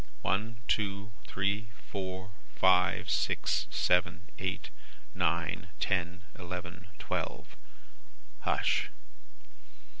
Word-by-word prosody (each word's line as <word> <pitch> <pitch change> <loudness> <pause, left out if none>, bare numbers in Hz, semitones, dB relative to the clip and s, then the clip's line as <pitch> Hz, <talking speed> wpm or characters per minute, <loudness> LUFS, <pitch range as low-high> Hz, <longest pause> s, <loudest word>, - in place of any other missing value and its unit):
One, 110 +4 +1
two, 100 0 0 0.2
three, 100 +3 0 0.2
four, 95 -1 -4 0.2
five, 95 -1 +4
six, - - +2
seven, 90 +1 +2
eight, 95 +2 -2 0.4
nine, 85 0 +1
ten, 90 -2 0 0.2
eleven, 90 0 -6
twelve. - - -3 0.8
Hush! - - +2
95 Hz, 80 wpm, -32 LUFS, 90-100 Hz, 0.8 s, five